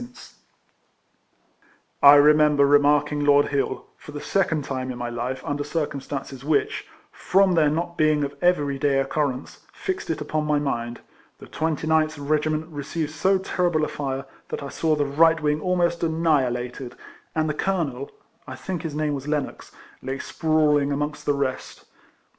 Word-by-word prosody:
32 240 - -7
RECOLLECTIONS 250 - -15 1.7
OF 140 - +9
I 145 - +10
remember 150 0 +5
remarking 145 +1 +3
Lord 145 0 +4
Hill, 140 -1 -2
for - - -12
the 145 - -5
second 160 -4 0
time 130 -1 -4
in 125 - -5
my 120 -1 -4
life, 120 +2 -4
under 145 0 -2
circumstances 145 -3 -4
Avhicli 145 +1 +1 0.4
(from 195 0 +2
their 160 -3 +4
not 170 +3 -3
being 155 -1 +3
of 140 0 -3
every 145 -6 +1
day 140 -1 +2
occurrence) 135 -1 -2
fixed 385 -2 -4
it 160 - -1
upon 150 +1 -2
my 150 -1 +2
mind. 120 -5 -3 0.4
The - - -12
29th 160 0 0
regiment 155 +2 0
received 150 +1 -4
so 190 +5 +2
terrible 175 -4 0
a - - -4
fire, 135 -1 -4 0.2
that - - -5
I 140 - -6
saw 160 +1 0
the 145 -1 0
right 160 +4 +4
wing 150 0 0
almost 175 -1 +1
annihi 160 -5 +2
lated, 125 +1 -5 0.4
and 155 0 +1
the 155 - -1
colonel 150 -7 -2 0.4
(I 130 - -7
think 180 +4 -5
his 160 -3 -5
name 150 -1 0
was 140 0 -5
Lennox) 150 -2 -3 0.3
lay 135 +1 -4
sprawling 150 -2 +1
amongst 150 +1 -3
the 145 - +3
rest. 135 -2 -4
150 Hz, 165 wpm, -24 LUFS, 140-160 Hz, 1.7 s, I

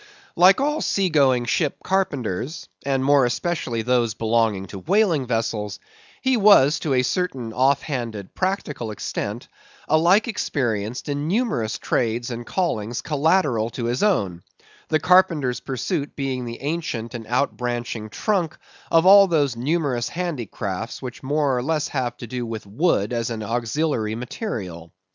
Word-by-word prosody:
Like 185 +3 +6
all 295 +3 0
sea 195 -2 +1
going 130 -5 +3
ship 145 +4 0
carpenters, 155 - -2 0.2
and 135 -1 0
more 140 -1 +5
especially 125 -2 -1
those 120 -3 +1
belonging 110 -3 +1
to 95 - -7
whaling 170 - +2
vessels, 110 -4 -2 0.4
he 260 -2 +3
was, 165 -8 +6
to 140 -4 0
a 125 - +3
certain 130 -7 -2
off 135 +3 +2
handed, 115 -9 -5
practical 185 - -2
extent, 105 - -4 0.4
alike 175 +8 +4
experienced 120 - -2
in 145 +1 -2
numerous 185 - 0
trades 120 +1 -1
and 120 0 -6
callings 120 - -2
collateral 150 -7 +2
to 120 0 -5
his 120 +2 -1
own; 100 - +1 0.5
the 155 - +2
carpenter's 170 -7 +3
pursuit 140 +3 -3
being 130 -3 -2
the 115 0 -7
ancient 140 -7 -3
and 115 -3 -7
outbranching 120 -3 -2
trunk 180 - -1 0.3
of 165 +1 +4
all 195 +1 +9
those 145 -7 +1
numerous 135 -1 -1
handicrafts 120 - -4
which 125 +1 -7
more 145 -1 +1
or 125 - 0
less 150 +2 -1
have 130 -3 -2
to - - -7
do 125 +1 -4
with 115 -3 -5
wood 110 - +1
as 115 -1 -1
an 110 -2 -4
auxiliary 115 0 -1
material. 100 - -6
130 Hz, 145 wpm, -23 LUFS, 115-165 Hz, 0.5 s, all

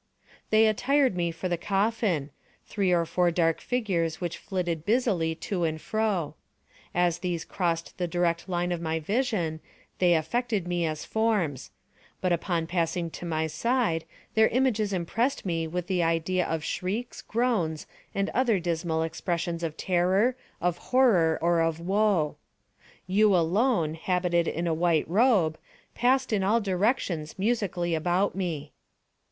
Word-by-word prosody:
They 215 +1 +5
attired 260 +2 +2
me 175 -1 0
for 165 +3 -4
the 175 -2 -1
coffin—three 195 - -1
or 170 -1 +3
four 175 +2 +2
dark 165 -1 +1
figures 180 -10 -1
which 170 -2 -4
flitted 175 -5 -3
busily 200 -7 +1
to 180 +1 -3
and 160 -1 -1
fro. 205 -7 -1 0.6
As 175 -1 +2
these 175 -2 -3
crossed 170 -1 -2
the 175 - 0
direct 170 +1 0
line 175 0 -1
of 175 -1 -2
my 160 -1 -1
vision 185 - -1 0.4
they 175 -2 +4
affected 205 +4 -1
me 175 -1 0
as 155 -1 -4
forms; 205 - 0 0.5
but 185 -2 +1
upon 170 -1 -1
passing 170 0 -1
to 175 - -7
my 160 -1 0
side 170 +1 0 0.3
their 220 0 +5
images 225 -5 +1
impressed 200 +9 -1
me 165 -3 -1
with 175 +2 -3
the 185 -1 0
idea 165 +2 +1
of 160 -1 -2
shrieks, 205 +9 -3
groans, 215 -10 -1 0.3
and 200 0 0
other 235 -6 +2
dismal 165 -1 -1
expressions 170 +1 -2
of 160 -2 -4
terror, 190 +7 +2 0.2
of 175 0 0
horror, 205 -12 +4
or 170 -1 +3
of 165 0 0
wo. 190 -3 +1 0.7
You 200 +2 +4
alone, 175 0 +2
habited 175 0 0
in 170 +2 -2
a 165 - +1
white 165 -1 +1
robe, 190 -5 +3 0.3
passed 255 0 +2
in 200 -2 +1
all 215 +4 +3
directions 190 - -1
musically 190 -5 0
about 175 +5 +1
me. 165 -6 -3
175 Hz, 145 wpm, -27 LUFS, 165-210 Hz, 0.7 s, They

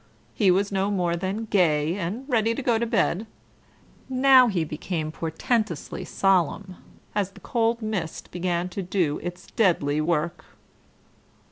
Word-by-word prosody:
He 205 -4 +3
was 195 +3 +2
no 195 0 0
more 180 -4 0
than 190 +5 -3
gay 165 -7 +2
and 205 +7 -4
ready 230 -3 +1
to 275 - -4
go 235 -3 +2
to 235 - -1
bed. 220 -2 +1 0.8
Now 260 -1 +6
he 190 -7 0
became 155 +1 -4
portentously 165 - -2
solemn, 185 0 +1 0.4
as 205 -2 0
the - - -14
cold 230 -1 0
mist 195 -7 -4
began 175 0 -1
to 190 +2 -4
do 175 -5 0
its 175 +1 -6
deadly 155 -8 +2
work. 170 +1 -1
190 Hz, 140 wpm, -25 LUFS, 170-220 Hz, 0.8 s, Now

